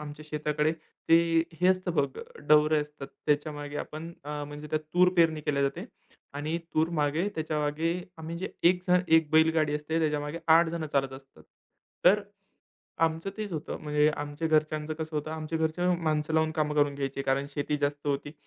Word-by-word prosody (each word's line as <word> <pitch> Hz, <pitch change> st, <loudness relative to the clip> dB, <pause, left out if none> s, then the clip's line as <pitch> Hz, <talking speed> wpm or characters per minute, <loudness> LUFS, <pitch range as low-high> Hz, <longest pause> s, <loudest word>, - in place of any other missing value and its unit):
आमच्या 150 Hz, 0 st, -8 dB
शेताकडे 150 Hz, 0 st, 0 dB, 0.4 s
ते, 165 Hz, 0 st, +5 dB, 0.2 s
हे 180 Hz, -, +4 dB
असतं 185 Hz, -1 st, +1 dB
बघ, 145 Hz, -, 0 dB, 0.3 s
डवरे 150 Hz, 0 st, +5 dB
असतात, 150 Hz, -2 st, -7 dB, 0.2 s
त्याच्यामागे 145 Hz, -1 st, -1 dB
आपण 160 Hz, +3 st, -6 dB
अ, 150 Hz, 0 st, -4 dB
म्हणजे 145 Hz, +1 st, -8 dB
त्यात 155 Hz, -, +1 dB
तूर 180 Hz, +1 st, +6 dB
पेरणी 160 Hz, -2 st, +4 dB
केल्या 145 Hz, -1 st, 0 dB
जाते 140 Hz, 0 st, -1 dB, 0.5 s
आणि 155 Hz, +3 st, -2 dB, 0.2 s
तूर 160 Hz, +1 st, +3 dB
मागे, 155 Hz, +7 st, +1 dB
त्याच्यामागे 155 Hz, +1 st, -1 dB, 0.3 s
आम्ही 160 Hz, +1 st, -6 dB
जे 190 Hz, -, -3 dB, 0.2 s
1 180 Hz, 0 st, +1 dB
जण, 180 Hz, 0 st, +4 dB
1 160 Hz, -2 st, +4 dB
बैलगाडी 160 Hz, -1 st, +3 dB
असते, 150 Hz, +2 st, -2 dB
त्याच्यामागे 150 Hz, 0 st, -1 dB, 0.2 s
8 165 Hz, 0 st, +5 dB
जणं 165 Hz, -1 st, -3 dB
चालत 135 Hz, -1 st, +1 dB
असतात. 135 Hz, 0 st, -13 dB, 0.6 s
तर, 195 Hz, +4 st, +6 dB, 0.8 s
आमचं 165 Hz, +4 st, -1 dB
तेच 210 Hz, -3 st, -4 dB
होतं. 155 Hz, -1 st, -4 dB
म्हणजे 150 Hz, 0 st, +3 dB
आमच्या 145 Hz, +2 st, -3 dB
घरच्यांचं 155 Hz, 0 st, +1 dB
कसं 155 Hz, 0 st, -5 dB
होतं, 150 Hz, +1 st, -3 dB
आमच्या 160 Hz, 0 st, -3 dB
घरचे 160 Hz, +3 st, 0 dB, 0.2 s
माणसं 155 Hz, 0 st, 0 dB
लावून 160 Hz, 0 st, +3 dB
कामं 150 Hz, -1 st, -1 dB
करून 145 Hz, -1 st, +2 dB
घ्यायची, 135 Hz, -1 st, -3 dB
कारण 135 Hz, +1 st, 0 dB
शेती 145 Hz, +1 st, -2 dB
जास्त 145 Hz, 0 st, -2 dB
होती. 145 Hz, +1 st, -2 dB
155 Hz, 170 wpm, -28 LUFS, 145-160 Hz, 0.8 s, तूर